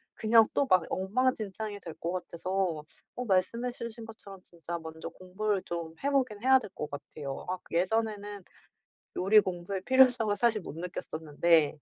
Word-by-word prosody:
그냥 225 0 +5
또 280 - +2
막 185 -1 +5
엉망진창이 210 0 -1
될 165 - -7
거 170 - -2
같아서 180 -2 -2 0.3
어 250 - -4
말씀해 230 +5 +1
주신 235 -2 -7
것처럼 200 -4 -11
진짜 170 0 -6
먼저 160 0 -7
공부를 190 +2 -2
좀 170 -1 -5
해 280 - +2
보긴 250 -7 +1
해야 265 +1 +6
될 210 - -9
거 150 - -4
같아요. 145 -1 -7
악 185 0 -3
예전에는 205 +2 -1 0.7
요리 200 +4 +6
공부의 185 +1 -4
필요성을 250 -3 +5
사실 225 -3 +2
못 155 - -8
느꼈었는데. 160 -2 +1
195 Hz, 320 characters per minute, -30 LUFS, 170-225 Hz, 0.7 s, 해야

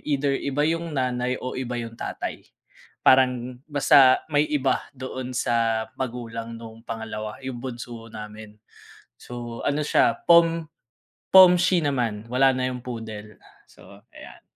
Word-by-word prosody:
either 140 -1 0
iba 140 +1 -3
yung 165 -1 -4
nanay 125 -2 -1
o 130 - -5
iba 125 -1 -4
yung 115 -1 -8
tatay, - - -6 0.6
parang 125 -1 +3
basta, 140 -2 +5
may 145 0 +4
iba 135 -3 +1 0.2
doon 130 0 -6
sa 115 -2 0
magulang 115 -2 -5
noong 115 0 -12
pangalawa, 110 -1 -6
yung 130 -2 -5
bunso 120 -2 -8
namin. 105 0 -10 0.6
So, 120 -1 -8
ano 145 +1 0
siya 115 -5 +3
Pom 165 -1 +5 0.7
Pomshi 185 -1 +7
naman 115 -7 -1
wala 135 +2 +4
na 130 0 -1
yung 125 -1 -6
Poodle. 110 -4 -8 0.3
So, 100 0 -17
ayan. - - -13
125 Hz, 130 wpm, -24 LUFS, 115-135 Hz, 0.7 s, Pomshi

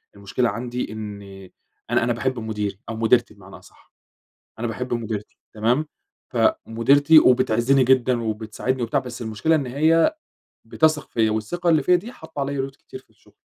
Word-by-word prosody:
المشكلة 100 +5 -1
عندي 120 +3 -4
إن 105 -2 -7 0.7
أنا - - +2
أنا 120 0 +1
باحب 125 +1 -2
مديري 105 -3 -4
أو 115 - -4
مديرتي 115 +1 +2
بمعنى 100 -2 -14
أصح، - - -21 0.7
أنا 120 - -2
باحب 125 +2 -4
مديرتي 110 -3 -5 0.2
تمام، 120 +8 +1 0.4
فمديرتي 145 - +4
وبتعزني 130 0 +3
جدًا 125 -1 +2
وبتساعدني 110 +3 -3
وبتاع 115 - 0
بس 125 -1 -8
المشكلة 115 +9 0
إن 145 -3 -1
هي 160 - +3 0.5
بتثق 155 -1 +1
فيّا 110 -2 +1
والثقة 140 +12 -2
اللي 155 -4 +3
فيّا 180 - +4
دي 210 +7 -4
حاطّة 160 - -10
عليّا 135 -1 -2
load 135 - -22
كتير 390 - -11
في - - -28
الشغل. - - -26
120 Hz, 160 wpm, -22 LUFS, 110-140 Hz, 0.7 s, فمديرتي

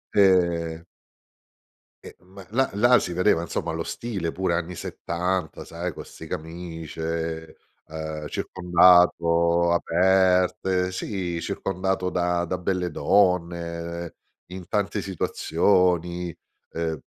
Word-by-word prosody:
Ehm 85 -4 +3 1.2
ehm, - - -11
ma 95 +1 -13
là 130 +4 +1
là 120 +4 +5
si 90 - -3
vedeva, 90 -1 +2
insomma, 85 -1 -3
lo 80 0 -3
stile 95 -9 -4
pure 95 -2 -1
anni 90 +1 -3
'70 90 +1 -3
sai, 85 +1 -4
con - - -9
'ste - - -11
camicie, 80 0 -5 0.3
ehm, 80 -1 -5
uhm, 75 - -6
circondato 85 -1 +4
aperte, 90 +1 +2
sì, 90 -3 -3
circondato 95 -1 -2
da 90 -1 0
da 90 - -2
belle 90 -1 -2
donne, 85 -1 0 0.4
in 90 -1 -8
tante 100 0 -1
situazioni, 90 -1 +1 0.4
ehm 80 -1 -3
90 Hz, 110 wpm, -25 LUFS, 85-95 Hz, 1.2 s, là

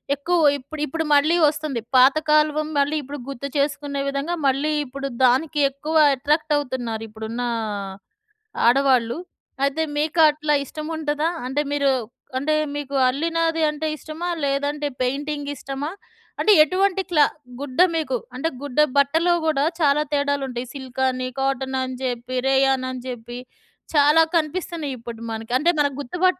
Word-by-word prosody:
ఎక్కువ 340 +5 0 0.2
ఇప్పుడు 290 +3 -9
ఇప్పుడు 325 +4 -2
మళ్ళీ 305 +4 +4
వస్తుంది. 295 -5 -2 0.2
పాత 260 +3 +7
కాలం 305 0 +3
మళ్ళీ 285 +2 +1
ఇప్పుడు 285 +2 -7
గుర్తు 275 0 -5
చేసుకునే 285 0 -1
విధంగా 280 +5 -2
మళ్ళీ 275 +3 +1
ఇప్పుడు 275 +1 -5 0.2
దానికి 290 +5 +2
ఎక్కువ 285 +4 -5 0.2
అట్రాక్టవుతున్నారిప్పుడున్న 250 -6 -2 1.3
ఆడవాళ్ళు. 255 -1 +3 0.5
అయితే 280 +3 -1 0.2
మీకట్లా 305 -1 +3
ఇష్టం 305 +3 -7
ఉంటదా? 300 +1 0 0.2
అంటే 270 +3 0
మీరు 280 -1 +2 0.5
అంటే 295 +4 0 0.2
మీకు 285 -1 -4
అల్లినాది 325 +4 0
అంటే 300 +1 -3
ఇష్టమా? 315 +3 -6 0.2
లేదంటే 285 +1 -1
పెయింటింగిష్టమా? 285 +1 -3 0.5
అంటే 430 - +4
ఎటువంటి 380 +4 +1
క్లా 300 -3 +5 0.3
గుడ్డ 280 +1 -6 0.2
మీకు 305 -5 -1 0.2
అంటే 295 +6 -1
గుడ్డ 285 0 -3 0.2
బట్టలో 320 +5 +3
గూడా 300 -3 +2
చాలా 290 -1 +3
తేడాలుంటాయి 275 -4 -1
సిల్‌కని, 260 -1 -2
కాటనని 265 -1 -1
జెప్పి, 255 0 -3
రేయాననిని 265 -2 +1
జెప్పి 240 -1 -7 0.6
చాలా 295 +2 +5
కనిపిస్తున్నాయిప్పుడు 295 -8 -3
మనకి. 225 +1 -6
అంటే 305 +6 +2
మనకు 285 -2 +1
గుర్తు 285 +6 -6
పట్టడానికి 370 0 +3
285 Hz, 125 wpm, -22 LUFS, 260-305 Hz, 1.3 s, పాత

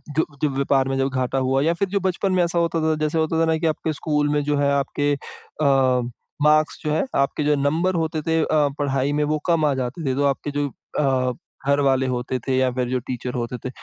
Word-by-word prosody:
जो 155 +2 +1 0.2
जो 150 - +3
व्यापार 135 -1 +1
में 135 - -1
जब 135 0 +1
घाटा 130 0 -1
हुआ 130 +1 +1
या 165 +2 +3
फिर 200 +3 -1
जो 200 +1 0
बचपन 190 +1 0
में 185 -1 +3
ऐसा 170 0 0
होता 170 -1 +1
था 160 0 +2
जैसे 155 +1 0
होता 160 +1 +1
था - - +4
ना 160 0 +2
कि 165 - -1
आपके 155 0 -1
स्कूल 150 0 0
में 145 0 +1
जो 145 0 0
है 140 0 +2
आपके 145 +1 0 0.5
अ, 150 - +3 0.8
मार्क्स 155 0 +3
जो 150 - 0
है, 155 - +1
आपके 140 +2 +1
जो 150 0 +3
नंबर 160 +7 +1
होते 160 -2 -1
थे 160 +1 +1
अ, - - 0 0.3
पढ़ाई 140 0 0
में 150 0 +1
वो 155 +1 0
कम 165 -3 +2
आ 145 - +3
जाते 130 +5 -4
थे। - - 0
तो 140 +1 0
आपके 140 +1 0
जो 145 0 -1 0.3
अ, 130 -3 +1 0.3
घर 140 0 +3
वाले 135 -1 +2
होते 125 0 -2
थे 130 +2 -2
या 130 -1 +2
फिर 125 -1 -2
जो 130 0 0
टीचर 125 0 -4
होते 120 0 -3
थे, 130 - -6
145 Hz, 245 wpm, -22 LUFS, 135-160 Hz, 0.8 s, था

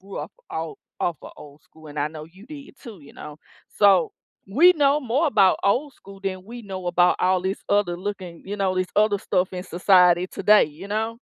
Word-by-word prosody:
grew 195 +1 -11
up - - -7 0.2
all 160 -1 -5 0.2
off 175 -2 -1
of - - -11
old 145 0 -14
school, 160 -1 -17
and 150 0 -8
I 145 +1 0
know 155 0 -9
you 185 +8 -17
did, 285 -3 -12
too, 225 - -11
you 140 - -16
know? 150 -1 -10 0.4
So, 195 -5 +4 0.4
we 320 - +6
know 290 -3 +2
more 270 +5 0
about 205 -9 +3
old 260 +9 +1
school 195 -5 -15
than 185 -1 -4
we 235 +3 -10
know 190 -3 -7
about 175 0 +3
all 185 0 +1
this 190 +1 -2
other 200 -4 +1
looking 185 -3 -7
you 205 +1 -5
know, 190 -2 0
this 185 0 0
other 210 -1 +3
stuff 185 -1 -1
in 180 -1 -5
society 180 -1 +3
today, 210 +2 +4
you 155 +6 -11
know? 220 +2 -2
190 Hz, 215 wpm, -23 LUFS, 175-210 Hz, 0.4 s, we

